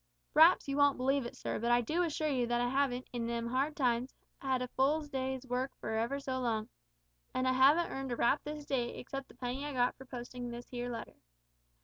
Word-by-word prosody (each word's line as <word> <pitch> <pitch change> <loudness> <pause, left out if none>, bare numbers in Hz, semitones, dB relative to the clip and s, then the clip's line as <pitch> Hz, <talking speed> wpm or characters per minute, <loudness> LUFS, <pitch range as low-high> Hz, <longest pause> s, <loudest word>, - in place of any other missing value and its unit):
"P'r'aps - - +7
you 275 0 -1
won't 285 -1 +5
believe 265 0 +1
it, - - -10
sir, - - -3
but 235 +2 0
I 240 0 +5
do 315 +9 0
assure 315 -2 0
you 255 -5 +1
that 240 0 +1
I 245 0 +1
haven't, 260 -1 0
in 235 -1 -2
them 235 0 -2
hard 265 +5 0
times, 250 -2 0 0.2
had 260 -2 0
a - - -3
full 280 +5 +2
day's 265 -3 -3
work 255 +1 -2
for - - -4
ever 230 +5 0
so 260 -2 -3
long. 225 -3 -1 0.7
And 255 0 +1
I 255 - +3
haven't 285 +7 +5
earned 270 -1 -4
a - - 0
rap 235 - +2
this 300 0 -6
day, 245 -4 -1
except 270 +1 -6
the - - -17
penny 250 +2 -4
I 290 -1 -4
got 245 -1 +2
for 265 - -11
postin' 245 -1 -6
this 240 +1 -8
here 245 -1 -4
letter." 230 -1 -6
255 Hz, 230 wpm, -33 LUFS, 240-275 Hz, 0.7 s, P'r'aps